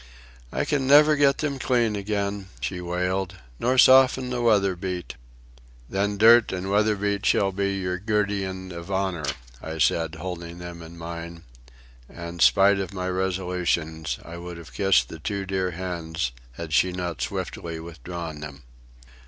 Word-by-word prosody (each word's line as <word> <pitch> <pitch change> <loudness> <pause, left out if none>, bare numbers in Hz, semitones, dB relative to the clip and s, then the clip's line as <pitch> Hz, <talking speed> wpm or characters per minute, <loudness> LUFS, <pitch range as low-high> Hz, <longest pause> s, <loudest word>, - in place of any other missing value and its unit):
"I - - -1
can 140 -3 0
never 150 +2 +7
get 140 -1 +4
them 140 -3 -2
clean 120 -4 +1
again," 100 -1 -2
she 90 -2 -3
wailed, 90 +2 -2 0.2
"nor 130 +2 +1
soften 130 0 +6
the 125 -1 -1
weather 100 -5 +3
beat." 90 -1 -4 0.7
"Then 100 +4 -1
dirt 115 +2 +7
and 95 +1 -3
weather 105 +1 +3
beat 100 0 -1
shall 100 -1 +3
be 100 0 -1
your 90 -1 -2
guerdon 100 -3 -1
of 85 +1 -8
honour," 95 -6 -1 0.3
I 80 0 -6
said, 80 +1 +1
holding 85 0 -6
them 85 -1 -8
in 85 +1 -11
mine; 85 0 -7 0.7
and, 85 0 -7
spite 100 0 +5
of 100 +1 -4
my 90 0 -2
resolutions, 90 -4 -1
I 85 +1 -8
would 85 0 -7
have 85 -1 -12
kissed 95 - +3
the 80 - -8
two 100 +5 -3
dear 95 -1 -1
hands 85 -5 -3 0.2
had 80 +3 -6
she 90 +4 +4
not 90 -3 -4
swiftly 85 -1 -4
withdrawn 85 -1 -7
them. 70 -1 -9
95 Hz, 155 wpm, -25 LUFS, 85-100 Hz, 0.7 s, never